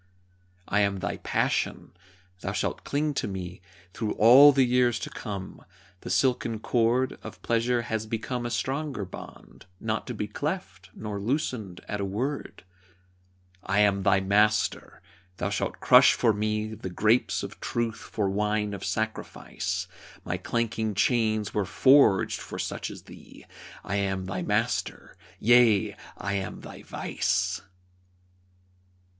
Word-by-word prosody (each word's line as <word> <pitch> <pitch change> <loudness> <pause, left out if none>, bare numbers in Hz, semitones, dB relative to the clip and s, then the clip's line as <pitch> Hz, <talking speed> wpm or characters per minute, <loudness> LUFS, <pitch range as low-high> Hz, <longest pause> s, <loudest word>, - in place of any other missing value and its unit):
I 105 - +1
am 100 -1 +2
thy 95 - -3
Passion. - - -1 0.5
Thou 95 +1 -4
shalt 105 - -2
cling 150 +1 -1
to - - -2
me 90 -2 -6 0.3
Through 110 -2 -2
all 130 +7 +8
the 135 -1 +3
years 125 -2 +3
to - - -6
come. 100 -3 -7 0.4
The - - -8
silken 115 +3 +1
cord 120 +3 +1
Of - - -10
Pleasure 120 +1 +1
has 110 -2 -3
become 115 +3 -3
a 120 - -2
stronger 135 -1 -2
bond, 95 - -12
Not 110 0 -3
to 125 - -4
be 105 - -3
cleft, 105 - -5
nor 105 -2 -5
loosened 110 - -2
at 105 -1 -3
a - - -1
word. 125 +9 -4 1.0
I 100 +1 +1
am 100 -1 +3
thy 95 0 +3
Master. 105 +2 +1 0.3
Thou - - -2
shalt - - -2
crush - - +7
for 115 - +2
me 110 +1 -2
The 95 - -6
grapes 110 +7 +2
of - - -8
truth 115 -2 -2
for 105 -2 -2
wine 105 +1 0
of 100 -1 -6
sacrifice; 95 -3 -3 0.4
My - - -2
clanking 115 -2 -2
chains 110 -2 +1
were 105 - +1
forged 130 -1 +4
for - - -8
such - - -4
as - - -10
thee, - - -14 0.4
I 100 - -2
am 95 -2 -1
thy 95 0 -3
Master - - -1 0.2
yea, 115 -3 +4 0.2
I 100 - -3
am 95 -1 -4
thy - - -10
vice! 90 +1 -1
105 Hz, 140 wpm, -27 LUFS, 100-120 Hz, 1.0 s, all